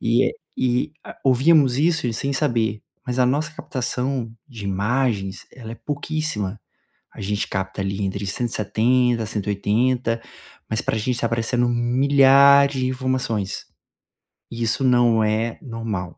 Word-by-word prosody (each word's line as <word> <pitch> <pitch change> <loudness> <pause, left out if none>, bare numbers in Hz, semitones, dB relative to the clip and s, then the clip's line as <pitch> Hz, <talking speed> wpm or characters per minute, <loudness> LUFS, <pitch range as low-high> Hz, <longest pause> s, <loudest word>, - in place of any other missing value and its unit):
e - - +3
é - - -1 0.2
e, 125 +3 0
ah, - - -10
ouvíamos 135 0 +4
isso 160 -2 +2
e - - -2
sem 140 +5 -2
saber, 115 -6 0 0.2
mas 125 0 -3
a - - +5
nossa 150 +4 0
captação 130 -3 -3 0.2
de 115 -6 -9
imagens, 100 0 -1
ela 115 -4 -10
é - - -6
pouquíssima. 140 -5 -3 0.5
A - - -12
gente 105 +1 -2
capta, 95 +1 -4
ali, 95 +1 -3
entre 100 +1 -3
170, 120 +2 +1
180, 115 +3 0 0.5
mas 110 - 0
para - - -1
gente 110 +4 -1
está 120 - -1
aparecendo 115 +1 0
milhares 140 +3 +5
de 130 - 0
informações. 130 -6 -2 0.9
E 115 0 -4
isso 115 +4 +1
não 120 -3 +4
é 110 +2 -1
normal. 115 -7 -5
120 Hz, 140 wpm, -22 LUFS, 110-130 Hz, 0.9 s, a